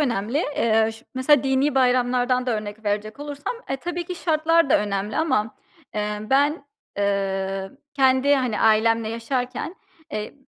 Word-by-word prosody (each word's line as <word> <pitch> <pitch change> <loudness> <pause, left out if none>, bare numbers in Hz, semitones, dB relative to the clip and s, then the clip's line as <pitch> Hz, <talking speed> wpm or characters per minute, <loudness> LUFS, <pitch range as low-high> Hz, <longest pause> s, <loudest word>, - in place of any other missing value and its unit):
önemli. 235 -2 0 0.2
Eee, 220 -1 +3
ş 225 - -15
mesela 270 +3 +4
dini 270 +2 +2
bayramlardan 250 0 +2
da 235 -3 +1
örnek 210 +1 -7
verecek 210 +4 -2
olursam, 290 - -5
e, - - -1
tabii 345 +4 -4
ki 360 - -5
şartlar 330 -2 +2
da - - +6
önemli 205 0 -2
ama, 225 -9 0 0.4
emm, 210 +1 -3
ben, 285 +2 +2 0.3
eee, 195 -1 -1 0.2
kendi, 265 +1 +4
hani, 255 -5 -1
ailemle 225 0 +3
yaşarken, 250 +7 -3 0.4
eee, 210 0 -4
245 Hz, 145 wpm, -23 LUFS, 215-280 Hz, 0.4 s, da